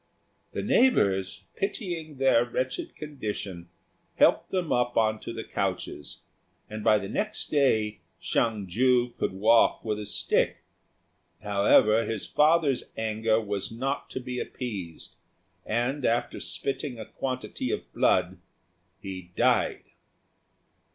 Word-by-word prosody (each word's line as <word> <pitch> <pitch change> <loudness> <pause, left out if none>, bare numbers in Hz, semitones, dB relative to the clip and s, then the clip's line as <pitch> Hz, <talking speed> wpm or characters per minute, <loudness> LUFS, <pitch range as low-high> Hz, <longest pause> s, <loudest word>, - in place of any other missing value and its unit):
The - - -3
neighbours, 100 - +2
pitying 175 - -4
their 130 -3 +4
wretched 130 +1 -3
condition, 105 - -6 0.5
helped - - +4
them 180 -4 -1
up 120 0 0
on 110 -1 +2
to - - -6
the 115 -1 -5
couches, 90 -7 -4 0.4
and 110 0 -6
by 110 -1 +5
the 100 -1 -4
next 215 - -2
day 110 - +2 0.2
Hsiang 110 -4 0
ju 125 +6 +2
could - - -2
walk 110 +6 +3
with 105 -1 -1
a 105 - -5
stick; - - +1 0.8
however, 105 +2 +4
his 110 -3 -3
father's 150 -3 +3
anger 110 0 +1
was 105 0 -3
not 135 +5 -3
to - - -4
be 125 0 -5
appeased, 100 -13 -6 0.5
and, 125 +5 -1
after 120 0 0
spitting 135 -2 -3
a 110 - -6
quantity 130 -1 -4
of - - -4
blood, 90 0 +2 0.6
he 95 -2 -8
died. - - +2
115 Hz, 125 wpm, -27 LUFS, 105-130 Hz, 0.8 s, by